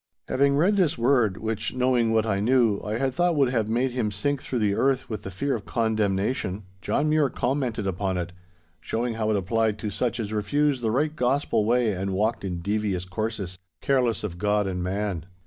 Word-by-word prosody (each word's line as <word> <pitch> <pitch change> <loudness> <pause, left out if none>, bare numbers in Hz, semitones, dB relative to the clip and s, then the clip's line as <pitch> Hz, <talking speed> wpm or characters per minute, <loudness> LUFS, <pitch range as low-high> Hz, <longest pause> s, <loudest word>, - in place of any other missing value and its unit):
"' - - -54
Having 140 +1 +3
read 195 +7 +3
this 175 -8 +2
word, 120 -5 +2
which, 110 +1 -3
knowing 125 -3 +2
what 110 -1 +2
I 100 -3 0
knew, 115 -2 +3
I 105 +1 -2
had 135 +1 0
thought 175 +3 +2
would 140 -4 +3
have 110 -4 0
made 125 +3 +1
him 120 -4 -1
sink 130 +8 -1
through 130 - -3
the 105 -3 +2
earth 135 +4 +1
with 105 -2 -3
the 95 - -6
fear 135 +9 -2
of 110 - -5
condemnation, 105 -2 0 0.2
John 145 +9 0
Mure 155 -2 +3
commented 125 -5 -1
upon 95 0 -1
it, 90 0 -4 0.5
showing 115 +8 -2
how 110 -1 -1
it 105 - +2
applied 110 +2 0
to 105 0 -4
such 120 +3 -1
as 110 -1 -3
refused 135 +6 +1
the 115 - 0
right 150 +7 0
gospel 125 -4 +1
way 120 0 +2
and 95 +1 -3
walked 110 +3 0
in 90 -3 -3
devious 100 -2 -1
courses, 100 -2 -4 0.2
careless 125 -6 +1
of 85 -5 -5
God 105 0 +1
and 90 -2 -3
man. 95 -2 -2
110 Hz, 205 wpm, -25 LUFS, 100-130 Hz, 0.5 s, Having